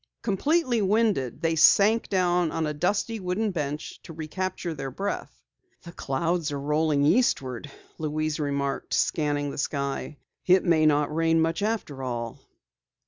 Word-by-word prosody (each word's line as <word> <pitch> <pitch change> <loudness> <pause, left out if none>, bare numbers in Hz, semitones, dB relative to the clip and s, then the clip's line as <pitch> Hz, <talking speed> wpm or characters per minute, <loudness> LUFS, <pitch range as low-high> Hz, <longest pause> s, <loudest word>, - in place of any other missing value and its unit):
Completely 245 - +1
winded, 195 - +1
they 165 0 +2
sank 205 +7 +5
down 180 -3 +2
on 160 - -1
a 150 - -2
dusty 205 +8 -1
wooden 195 +3 -1
bench 150 -3 -4
to 165 - -11
recapture 170 +2 -4
their 135 -3 -5
breath. 195 +10 -5 0.4
"The 170 - -9
clouds 165 +2 -1
are 140 - -3
rolling 150 0 +1
eastward," 145 - +1 0.3
Louise 155 0 -2
remarked, 140 -2 -2
scanning 145 -2 0
the - - -6
sky. 140 0 -3 0.3
"It 185 +1 +5
may 160 -3 +4
not 150 0 +2
rain 165 0 +2
much 165 +3 0
after 205 -11 -2
all." 120 -3 -4
160 Hz, 140 wpm, -26 LUFS, 145-185 Hz, 0.4 s, sank